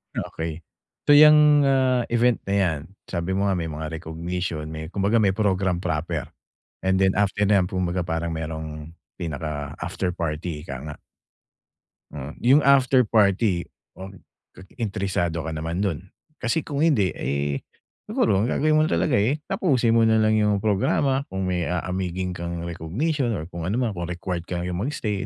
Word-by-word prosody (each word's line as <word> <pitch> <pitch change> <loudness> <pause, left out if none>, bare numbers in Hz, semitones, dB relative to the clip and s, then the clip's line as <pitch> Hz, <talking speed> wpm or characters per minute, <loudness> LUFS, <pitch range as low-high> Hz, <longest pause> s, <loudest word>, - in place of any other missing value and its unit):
Okey. 80 0 -4 0.4
So - - +6
yang, 150 -1 +7
ah, 130 -2 +3
event 120 0 +3
na 100 - +1
yan, 90 -6 +1 0.3
sabi 85 0 -3
mo 100 +1 +1
nga 95 - +1
may 85 -2 -2
mga 75 +1 -5
recognition 85 -1 -4
may 80 0 -6
kumbaga 100 +4 +2
may 100 -3 +3
program 95 -4 +1
proper, 80 -3 -2 0.6
and 95 0 +2
then 95 0 +3
after 105 +1 +1
na 100 -1 +5
yan, 90 - +1
'kumbaga 90 -1 -1
parang 85 0 -2
mayrong 80 -1 -6 0.3
pinaka 75 -2 -4
after 90 +2 -2
party, 80 -2 -4
ika 70 - -5
nga. 75 -1 -7 1.2
Mm, 75 0 -6
yung 135 +5 +5
after 135 -2 +5
party, 100 -4 +2 0.3
oh, 95 - -6 0.7
interesado 95 -7 -1
ka 80 - -4
naman 80 +4 -3
do'n? 90 -7 -1 0.4
Kasi 125 +6 0
kung 140 -1 -4
hindi, 140 - +3
eh, 70 +2 -2 0.5
siguro 95 - +2
ang 110 - +1
gagawin 155 +4 +2
mo 155 - +4
talaga, 85 +4 +2
eh, 130 +9 +1
tapusin 130 -10 +2
mo 115 0 +4
na 110 - +4
lang 110 0 +3
yung 105 -2 +1
programa 130 +7 +1
kung 95 0 -4
may 90 -2 -1
aamigin 90 +1 -2
kang 85 -1 -5
recognition 115 - -2
or 80 - -4
kung 85 0 -5
ano 100 - -1
man, 120 -2 0
kung 85 -3 -5
required 90 0 -4
kayong 90 0 -3
mag-stay, 105 -4 -2
95 Hz, 165 wpm, -24 LUFS, 85-110 Hz, 1.2 s, yang